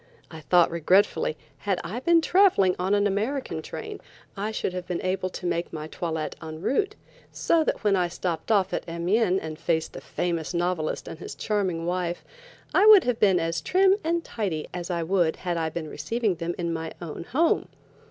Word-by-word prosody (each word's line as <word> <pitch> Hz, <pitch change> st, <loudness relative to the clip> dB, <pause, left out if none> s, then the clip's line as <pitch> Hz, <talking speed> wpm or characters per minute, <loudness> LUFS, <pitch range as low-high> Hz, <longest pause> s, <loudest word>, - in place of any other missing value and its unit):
I 160 Hz, -, -8 dB
thought 170 Hz, +3 st, +4 dB
regretfully, 170 Hz, -1 st, +2 dB, 0.2 s
had 195 Hz, -3 st, -1 dB
I 210 Hz, +8 st, -4 dB
been 335 Hz, +5 st, +4 dB
traveling 340 Hz, -, +4 dB
on 190 Hz, +3 st, +2 dB
an 205 Hz, 0 st, +2 dB
American 205 Hz, -, -1 dB
train, 430 Hz, -, -7 dB, 0.3 s
I 205 Hz, +1 st, -2 dB
should 220 Hz, -4 st, -2 dB
have 180 Hz, -1 st, -5 dB
been 180 Hz, -, -3 dB
able 185 Hz, 0 st, -1 dB
to 180 Hz, -, -8 dB
make 170 Hz, 0 st, -1 dB
my 155 Hz, -1 st, -5 dB
toilet 160 Hz, -1 st, -4 dB
en 155 Hz, -1 st, -7 dB
route, 395 Hz, -, 0 dB, 0.4 s
so 330 Hz, -1 st, +2 dB
that -, -, -2 dB
when 205 Hz, -2 st, +3 dB
I 180 Hz, -2 st, +2 dB
stepped 170 Hz, +2 st, -3 dB
off 195 Hz, -3 st, +2 dB
at -, -, -1 dB
Amiens 185 Hz, +3 st, +1 dB
and 155 Hz, 0 st, -6 dB
faced 165 Hz, -1 st, -1 dB
the -, -, -8 dB
famous 170 Hz, -1 st, -3 dB
novelist 175 Hz, -2 st, -1 dB
and 155 Hz, -, -8 dB
his -, -, -7 dB
charming 190 Hz, -6 st, -1 dB
wife, 175 Hz, 0 st, -2 dB, 0.5 s
I 400 Hz, +3 st, +5 dB
would 425 Hz, -4 st, +9 dB
have 245 Hz, -2 st, -1 dB
been 195 Hz, -4 st, +4 dB
as 165 Hz, 0 st, -1 dB
trim 380 Hz, -, +4 dB
and 335 Hz, +1 st, 0 dB
tidy 185 Hz, -9 st, -3 dB
as 175 Hz, 0 st, -5 dB
I 170 Hz, -2 st, -1 dB
would 175 Hz, -2 st, +2 dB
had 175 Hz, -2 st, -3 dB
I 165 Hz, -1 st, -1 dB
been 160 Hz, 0 st, -5 dB
receiving 225 Hz, +5 st, -1 dB
them 170 Hz, 0 st, -4 dB
in 170 Hz, -1 st, -2 dB
my 160 Hz, 0 st, -4 dB
own 170 Hz, -1 st, -7 dB
home. 310 Hz, -, +1 dB
180 Hz, 195 wpm, -26 LUFS, 165-215 Hz, 0.5 s, would